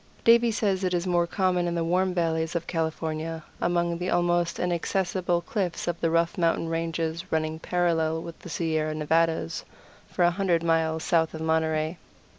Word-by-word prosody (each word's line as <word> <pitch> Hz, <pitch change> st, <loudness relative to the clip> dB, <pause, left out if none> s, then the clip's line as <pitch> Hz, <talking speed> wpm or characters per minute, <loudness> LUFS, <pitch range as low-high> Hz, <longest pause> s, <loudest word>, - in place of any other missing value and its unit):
Davie 235 Hz, 0 st, +6 dB
says 200 Hz, -4 st, 0 dB
it 180 Hz, -1 st, +1 dB
is 175 Hz, +1 st, -1 dB
more 175 Hz, -1 st, +2 dB
common 180 Hz, -1 st, +1 dB
in 170 Hz, -, -1 dB
the 170 Hz, -, 0 dB
warm 185 Hz, +3 st, +1 dB
valleys 165 Hz, -1 st, -1 dB
of 170 Hz, -1 st, -1 dB
California, 160 Hz, -1 st, -3 dB, 0.2 s
among 170 Hz, -1 st, 0 dB
the 180 Hz, +1 st, -2 dB
almost 175 Hz, -1 st, +1 dB
inaccessible 180 Hz, 0 st, 0 dB
cliffs 180 Hz, -1 st, -3 dB
of 170 Hz, -1 st, -2 dB
the 165 Hz, -, +2 dB
rough 170 Hz, +2 st, +1 dB
mountain 165 Hz, -1 st, +1 dB
ranges 165 Hz, +1 st, -2 dB
running 160 Hz, 0 st, -1 dB
parallel 165 Hz, -2 st, 0 dB
with 170 Hz, -1 st, -9 dB
the -, -, -10 dB
Sierra 155 Hz, -2 st, -1 dB
Nevadas 160 Hz, -, 0 dB, 0.4 s
for 180 Hz, -, 0 dB
a 175 Hz, -, +5 dB
hundred 175 Hz, -3 st, +1 dB
miles 160 Hz, -1 st, +1 dB
south 165 Hz, -2 st, +1 dB
of 160 Hz, -, -6 dB
Monterey. 160 Hz, 0 st, 0 dB
170 Hz, 170 wpm, -26 LUFS, 160-175 Hz, 0.4 s, Davie